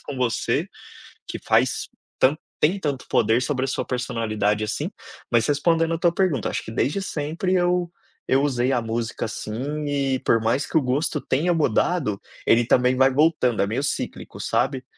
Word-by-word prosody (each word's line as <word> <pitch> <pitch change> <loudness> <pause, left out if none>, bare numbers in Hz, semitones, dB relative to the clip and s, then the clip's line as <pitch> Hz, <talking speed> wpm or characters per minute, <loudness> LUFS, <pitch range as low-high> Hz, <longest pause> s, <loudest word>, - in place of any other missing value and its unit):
com 145 - -7
você, 125 -3 0 0.6
que - - -5
faz - - +1 0.3
tanto 140 +4 +3 0.2
tem 170 +6 +3
tanto 140 -6 -3
poder 115 +2 +3
sobre 130 -1 -1
a - - -6
sua - - -2
personalidade, 110 -4 -1
assim. 105 - -3 0.4
Mas 120 -1 +3
respondendo 165 +3 +2
a 165 - -2
tua 170 0 +3
pergunta, 170 - 0
acho - - -3
que 110 - -8
desde 140 - 0
sempre 165 +2 -2
eu 175 -1 +1 0.4
eu 135 +1 +4
usei 130 -2 +1
a 125 -3 +1
música 115 0 -3
assim 135 +8 -4
e 140 -2 0
por 115 - +3
mais 115 +6 0
que - - -3
o 155 - +5
gosto 145 +5 0
tenha 170 +5 0
mudado, 145 - +1 0.3
ele 115 0 +4
também 125 +1 +3
vai 135 +1 +4
voltando, 140 -6 +2
é 100 - +2
meio 115 +7 -2
cíclico, 140 - -4
sabe. 130 -1 0
135 Hz, 175 wpm, -23 LUFS, 120-155 Hz, 0.6 s, o